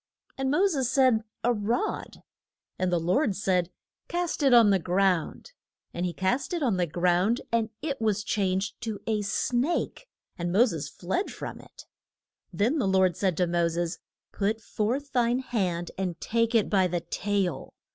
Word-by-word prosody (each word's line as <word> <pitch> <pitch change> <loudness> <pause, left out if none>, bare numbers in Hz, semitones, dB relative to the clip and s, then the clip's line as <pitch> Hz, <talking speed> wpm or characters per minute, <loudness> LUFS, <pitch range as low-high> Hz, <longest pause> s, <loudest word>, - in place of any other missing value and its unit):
And 270 0 -1
Mo 355 +8 +3
ses 275 -10 +1
said, 255 -4 +3 0.2
A 245 - +3
rod, 230 - -2 0.6
And 185 -1 +1
the 175 - +2
Lord 190 - +1
said, 185 -4 +1 0.4
Cast 350 -2 -2
it 275 -2 +4
on 230 -4 +7
the 195 - +3
ground. 180 - 0 0.4
And 175 +1 -1
he - - -2
cast 250 - -1
it 335 - -2
on 225 -8 +1
the 175 -1 +1
ground, 180 +7 +1
and 230 -1 +1
it 280 -6 -3
was 210 -2 +1
changed 195 -1 -1
to 220 -3 -4
a 220 -2 0
snake, 255 - -1 0.3
and 175 0 -1
Mo 215 +7 +5
ses 160 - -4
fled 190 - -2
from - - -7
it. - - -15 0.7
Then 245 +10 +1
the 235 - +1
Lord 190 -2 +3
said 185 -3 0
to 180 - +3
Mo 170 0 +1
ses, 170 +1 -2 0.3
Put 215 +2 -1
forth 250 +6 -2
thine 240 -1 +2
hand, 190 -9 -2
and 180 -4 -2
take 230 +1 0
it 220 - +4
by 190 -3 +3
the 175 -1 -2
tail. 185 -3 -2
205 Hz, 175 wpm, -27 LUFS, 180-245 Hz, 0.7 s, on